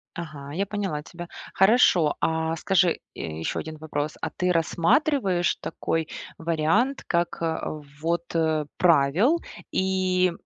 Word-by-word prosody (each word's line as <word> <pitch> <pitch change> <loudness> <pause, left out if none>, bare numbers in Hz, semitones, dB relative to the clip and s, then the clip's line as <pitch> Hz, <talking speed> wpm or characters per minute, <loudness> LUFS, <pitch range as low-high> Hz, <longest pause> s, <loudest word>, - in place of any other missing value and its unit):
Ага, 145 -4 -7
я 195 +5 0
поняла 195 -7 -3
тебя. 175 +3 -9 0.3
Хорошо. 190 -7 +5
А, 160 0 0
скажи, 185 0 +2 0.2
э, - - -10 0.2
ещё 80 - -2
один 155 0 -6
вопрос. 150 -1 -3
А - - -1
ты 180 0 0
рассматриваешь 180 - +2
такой 165 0 -2 0.3
вариант 170 - +1
как 170 0 0 0.6
вот, 170 +1 -2
э, 160 -2 +1
правил 175 - +4 0.3
и 185 -1 +2
170 Hz, 120 wpm, -25 LUFS, 160-190 Hz, 0.6 s, Хорошо